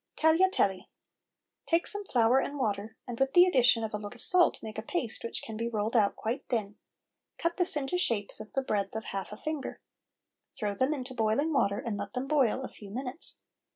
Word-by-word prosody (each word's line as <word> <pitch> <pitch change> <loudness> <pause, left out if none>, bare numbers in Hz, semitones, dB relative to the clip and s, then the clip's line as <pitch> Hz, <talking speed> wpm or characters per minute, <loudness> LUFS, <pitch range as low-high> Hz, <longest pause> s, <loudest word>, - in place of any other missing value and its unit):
TAGLIATELLI. 320 - +3 0.8
Take 335 +1 +2
some 410 0 -3
flour 245 -3 +4
and 285 +2 -3
water, 215 -3 -2
and 240 -2 -5
with 270 0 +2
the 355 0 +8
addition 250 -8 +4
of 220 0 -3
a - - 0
little 205 0 -7
salt 360 -1 +3
make 215 -1 -5
a - - -2
paste 240 -1 -3
which 230 - -4
can 220 - -7
be 230 +2 -2
rolled 220 +1 -1
out 210 -3 +4
quite 230 +5 -2
thin; 210 -4 -1 0.6
cut 335 0 -1
this 360 -4 +2
into 295 +6 -1
shapes 210 - -1
of 215 0 -9
the 270 - 0
breadth 205 -4 -1
of 220 - -3
half 195 0 -5
a 210 - -7
finger. 310 0 -4 0.8
Throw 210 -2 -2
them 260 +8 +1
into 260 -1 -6
boiling 245 +7 +1
water 200 -7 +2
and 230 -4 -3
let 205 +2 -5
them 255 +2 -3
boil 265 -3 +2
a - - -3
few 205 - -12
minutes. 255 +7 -4
240 Hz, 205 wpm, -30 LUFS, 215-285 Hz, 0.8 s, the